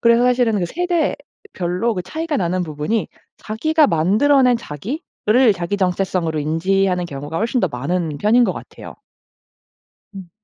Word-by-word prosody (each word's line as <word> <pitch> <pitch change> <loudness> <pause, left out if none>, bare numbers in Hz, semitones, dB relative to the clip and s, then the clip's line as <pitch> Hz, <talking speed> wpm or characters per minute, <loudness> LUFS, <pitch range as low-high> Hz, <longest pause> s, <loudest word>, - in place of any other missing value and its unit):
그래서 235 +1 +4
사실은 245 -3 +2
그 175 - -1
세대별로 235 - -2
그 180 - -3
차이가 320 - -3
나는 180 0 0
부분이 155 +8 -2 0.3
자기가 310 +8 +1
만들어 215 - +3
낸 250 -2 +3
자기를 230 - 0
자기 180 +3 -3
정체성으로 180 -3 0
인지하는 180 +4 0
경우가 145 +2 -5
훨씬 235 +3 0
더 185 - +1
많은 150 +3 -3
편인 230 +6 +4
것 - - 0
같아요. - - -10 1.2
음. 190 -3 -10
195 Hz, 320 characters per minute, -19 LUFS, 170-245 Hz, 1.2 s, 그래서